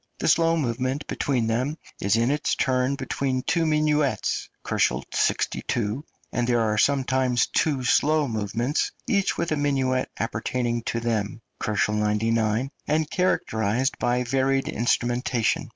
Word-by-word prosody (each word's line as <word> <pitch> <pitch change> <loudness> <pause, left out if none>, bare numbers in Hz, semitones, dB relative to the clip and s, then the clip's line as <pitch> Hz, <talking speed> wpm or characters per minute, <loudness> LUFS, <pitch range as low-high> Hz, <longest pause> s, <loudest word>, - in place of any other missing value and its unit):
The - - -2
slow 165 0 +4
movement 130 +1 -1
between 125 -5 -1
them 125 +7 -1 0.2
is 100 +2 +2
in 115 +3 +2
its 145 0 0
turn 130 +1 +1
between 130 -2 -2
two 165 -1 +1
minuets 150 -6 +1 0.2
(62 - - +1 0.6
K.), 120 +5 -2 0.3
and 120 -1 +1
there 120 -1 +2
are 110 -1 +1
sometimes 130 -2 +2
two 140 -5 0
slow 150 +4 +3
movements, 115 +5 -1
each 200 -2 +1
with 170 -1 -1
a 155 - +1
minuet 135 -3 0
appertaining 120 +2 -2
to 115 - -1
them 110 -1 -2 0.2
(99 105 0 +1 0.5
K.), - - -42 0.2
and 155 0 +1
characterised 130 - 0
by 125 0 +1
varied 135 +2 +1
instrumentation. 120 0 0
130 Hz, 135 wpm, -25 LUFS, 115-145 Hz, 0.6 s, slow